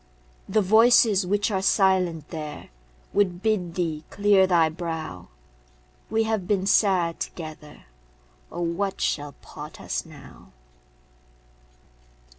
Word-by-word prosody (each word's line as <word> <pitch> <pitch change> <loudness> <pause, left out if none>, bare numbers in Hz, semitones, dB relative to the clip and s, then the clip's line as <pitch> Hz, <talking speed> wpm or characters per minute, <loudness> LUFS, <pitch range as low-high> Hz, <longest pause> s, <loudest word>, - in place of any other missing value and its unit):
The 210 +2 +2
voices 220 -1 +5
which 205 +3 0
are 190 -2 0
silent 185 -6 +2
there 155 -3 -7 0.4
Would 185 -2 +1
bid 185 -6 0
thee 160 -4 -2
clear 200 -2 +3
thy 170 -3 +4
brow; 160 - -6 0.8
We 225 0 +1
have 220 -5 -2
been 195 -2 +1
sad 185 -4 +2
together. 155 -3 -8 0.7
Oh, 175 - -5
what 180 +4 -2
shall 145 -1 -2
part - - -10
us - - -3
now? - - -15
185 Hz, 110 wpm, -25 LUFS, 165-205 Hz, 0.8 s, voices